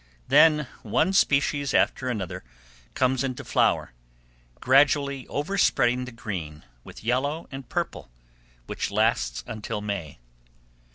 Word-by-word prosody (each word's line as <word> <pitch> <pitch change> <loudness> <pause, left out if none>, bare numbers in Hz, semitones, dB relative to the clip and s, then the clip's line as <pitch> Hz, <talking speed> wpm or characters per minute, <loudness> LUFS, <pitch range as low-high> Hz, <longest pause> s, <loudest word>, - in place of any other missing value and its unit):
Then 150 -2 +5 0.2
one 115 - +1
species 140 -4 +2
after 130 -2 +2
another 100 -7 -4 0.5
comes 130 0 +1
into 130 -2 -4
flower, - - +1 0.7
gradually 140 0 +3
overspreading 135 -7 +1
the 125 - -9
green 90 -10 -6 0.2
with - - -12
yellow 140 +7 -1
and 135 -2 -8
purple, - - -3 0.6
which - - -3
lasts 110 +3 0
until 110 -2 -5
May. 100 -8 -5
125 Hz, 110 wpm, -25 LUFS, 110-140 Hz, 0.7 s, Then